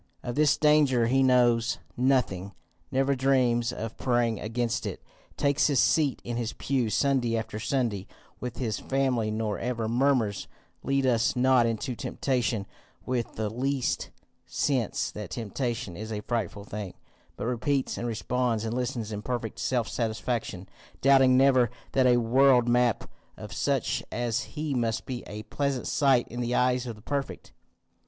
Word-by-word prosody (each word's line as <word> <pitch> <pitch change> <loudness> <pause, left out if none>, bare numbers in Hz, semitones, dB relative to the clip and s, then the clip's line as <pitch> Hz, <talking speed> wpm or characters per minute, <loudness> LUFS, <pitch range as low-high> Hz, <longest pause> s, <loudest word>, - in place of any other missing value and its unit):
Of 120 - -3
this 150 +1 +3
danger 150 -6 +4
he 130 +3 +3
knows 120 -3 +3 0.2
nothing, 120 -7 +1 0.4
never 135 +1 +1
dreams 125 -3 +2
of 115 0 -6
praying 120 -3 +1
against 115 +1 -2
it, - - -6 0.3
takes 140 -1 +2
his 140 -4 +2
seat 145 -5 +2
in 120 0 -3
his 115 -2 -2
pew 130 -5 -1
Sunday 125 -2 +1
after 110 -1 -4
Sunday 115 -6 -1 0.3
with 125 -1 -5
his 115 -5 -2
family, 130 -5 0
nor 110 -1 -2
ever 115 -2 -2
murmurs 120 -3 +1 0.3
Lead 135 0 0
us 115 -2 +2
not 125 -1 +4
into 115 +3 -2
temptation 120 -4 -1 0.4
with 125 -2 -2
the 110 -1 -1
least 130 +4 -1 0.4
sense 130 -7 0
that 105 -3 -7
temptation 115 -4 -3
is 110 +4 -6
a 105 -1 -3
frightful 105 -4 -3
thing, 105 -2 -6 0.4
but - - -4
repeats 125 +3 0
and 120 - -3
responds 115 0 -1
and 110 - -2
listens 120 -3 -3
in 105 -1 -4
perfect 115 -1 -4
self 125 -4 0
satisfaction, 110 -4 -3 0.3
doubting 135 -1 +6
never 130 -3 +5 0.2
that 130 -1 +3
a 120 -1 +5
world 125 +1 +4
made 120 0 +4
up 115 - -5 0.3
of - - -8
such - - 0
as 120 +3 -2
he 150 -1 -1
must 115 -3 -1
be 125 -2 -5
a 105 +1 -7
pleasant 140 -1 -2
sight 135 -4 +3
in 120 +1 -5
the 120 +1 -1
eyes 125 0 +2
of 115 - -5
the 105 - -17
Perfect. 140 -1 -4
120 Hz, 160 wpm, -27 LUFS, 115-130 Hz, 0.4 s, doubting